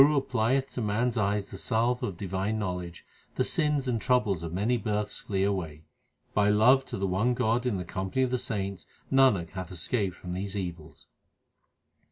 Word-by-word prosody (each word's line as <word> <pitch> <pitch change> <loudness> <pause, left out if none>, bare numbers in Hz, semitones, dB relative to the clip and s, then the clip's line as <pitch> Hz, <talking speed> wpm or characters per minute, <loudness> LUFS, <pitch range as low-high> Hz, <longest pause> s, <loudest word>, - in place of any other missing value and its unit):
When 135 - +9
the 150 - +1
Guru - - -6
applieth 130 +2 +1
to 125 - -4
man 110 +3 +1
s 120 - -4
eyes 100 -1 0
the 95 - -7
salve 120 +3 +1
of 95 -4 -3
divine 95 +3 -2
knowledge, 90 -4 -4 0.3
the - - +2
sins 150 -4 +1
and 115 -3 0
troubles 125 -9 +2
of 85 -1 -5
many 105 +8 +1
births 105 -2 -2
flee 95 -2 -1
away. 85 -6 -2 0.5
By 105 0 +3
love 125 +6 +5
to - - -4
the 100 - -1
one 100 +7 +1
God 120 +1 +1
in 110 -6 0
the 90 - -4
company 95 +9 -1
of 130 - 0
the 125 - +1
saints 100 -6 -3 0.2
Nanak 130 -11 +4
hath 95 -1 -6
escaped 95 +1 -1
from 90 -1 -7
these 95 +2 -3
evils. 85 -4 -6
105 Hz, 200 wpm, -28 LUFS, 95-125 Hz, 0.5 s, When